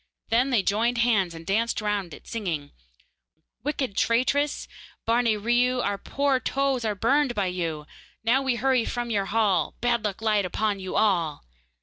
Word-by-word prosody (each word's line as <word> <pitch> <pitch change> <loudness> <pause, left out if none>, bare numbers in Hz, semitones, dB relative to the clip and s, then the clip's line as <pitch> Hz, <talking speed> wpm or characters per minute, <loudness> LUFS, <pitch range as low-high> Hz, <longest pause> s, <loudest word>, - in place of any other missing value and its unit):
Then 245 +4 +3
they 235 -7 +2
joined 230 +5 +1
hands 210 -8 +2
and 165 0 -10
danced 225 +5 0
round 205 -4 -2
it, - - -12
singing: 170 -11 -3 0.9
Wicked 270 -7 -2
traitress, 275 +7 +1 0.4
Barne 230 -2 +2
Riou, 245 +2 +2
Our 200 -1 -1
poor 280 +2 0
toes 270 -2 0
are 215 -2 -1
burned 265 +5 +2
by 200 - +1
you; 165 -4 -3 0.4
Now 240 +4 +3
we 265 -2 0
hurry 255 0 +2
from 240 0 -3
your 200 -3 +1
hall 200 -6 +1
Bad 240 -2 +1
luck 205 -3 -2
light 210 -2 +2
upon 205 +2 -1
you 185 -1 -5
all. 170 -8 +1
225 Hz, 160 wpm, -26 LUFS, 195-245 Hz, 0.9 s, Then